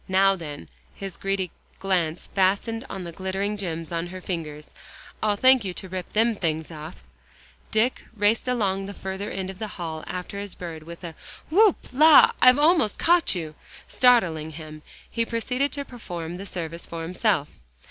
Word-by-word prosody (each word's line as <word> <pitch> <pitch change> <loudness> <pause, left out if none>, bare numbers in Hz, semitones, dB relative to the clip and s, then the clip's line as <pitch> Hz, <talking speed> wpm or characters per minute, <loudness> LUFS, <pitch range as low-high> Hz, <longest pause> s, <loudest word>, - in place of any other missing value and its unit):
Now 195 +1 +4
then," 150 - -8 0.3
his 195 -2 -6
greedy 195 -3 -2 0.3
glance 175 -4 0
fastened 200 +4 +1
on 190 - -5
the 170 - -6
glittering 190 +4 -2
gems 165 -5 -5
on 170 0 -2
her 185 +1 -7
fingers, 155 -5 -5 0.5
"I'll 210 -1 +2
thank 260 +2 +5
you 185 -3 -4
to 190 - -5
rip 185 -1 -5
them 225 +2 +2
things 160 -5 -2
off." 155 +1 -9 0.7
Dick, 225 +4 +1
racing 215 +5 +2
along 195 -5 0
the 200 - -7
further 190 +2 -5
end 190 0 -4
of 190 - -14
the 220 - -3
hall 160 -3 -5
after 180 +2 -5
his 200 -1 -5
bird 165 -3 -7
with 170 +3 -11
a 170 -2 -6 0.4
"Whoop, 410 +2 +6 0.2
la 305 +3 +8
I've 255 +1 +8
almost 300 - +4
caught 345 - +3
you," 160 -3 -4 0.3
startling 170 -11 +3
him, 155 -1 -9 0.3
he 230 - -1
proceeded 250 +4 -1
to 285 -1 -4
perform 175 -9 -6
the 195 +2 -7
service 170 -2 -5
for 165 -1 -5
himself. 175 -3 +1
190 Hz, 170 wpm, -25 LUFS, 170-220 Hz, 0.7 s, la